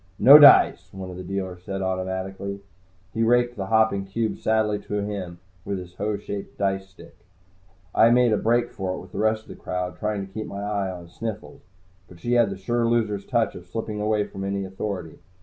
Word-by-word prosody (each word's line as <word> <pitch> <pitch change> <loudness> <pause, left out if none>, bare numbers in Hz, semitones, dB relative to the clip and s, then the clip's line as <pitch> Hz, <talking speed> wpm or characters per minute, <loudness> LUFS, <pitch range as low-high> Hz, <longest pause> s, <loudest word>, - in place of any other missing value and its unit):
"No 140 +6 +10
dice," 145 - +7
one 95 -1 -7
of 90 - -9
the 90 - -7
dealers 95 -1 -4
said 95 +1 -4
automatically. 95 +1 -3 0.5
He 115 - -2
raked 120 +1 +3
the 95 -2 -4
hopping 110 -2 +2
cubes 110 +3 -3
sadly 110 -1 +1
to 105 0 -3
him 95 -4 -5 0.3
with 100 0 -3
his 90 -1 -9
hoe 105 +2 -2
shaped 100 0 -7
dice 95 -1 -1
stick. 95 - -16 0.8
I 115 - +6
made 120 -1 +4
a - - +2
break 120 +2 +1
for 95 -1 -3
it - - -7
with 90 - -13
the - - -6
rest 110 0 +1
of - - -22
the - - -8
crowd, 90 0 -4
trying 105 -2 -2
to 95 - -18
keep 110 0 -5
my 100 +1 -6
eye 100 -2 -1
on 90 -2 -8
Sniffles. 110 +4 -7 0.5
But 85 - -15
she 120 +7 -2
had 120 -3 +4
the 95 - -5
sure 115 +5 0
loser's 110 -4 0
touch 115 -4 +1
of 90 0 -11
slipping 105 +2 -4
away 105 -1 +1
from 95 -1 -8
any 100 0 -2
authority. 95 -3 -5
100 Hz, 210 wpm, -24 LUFS, 95-110 Hz, 0.8 s, No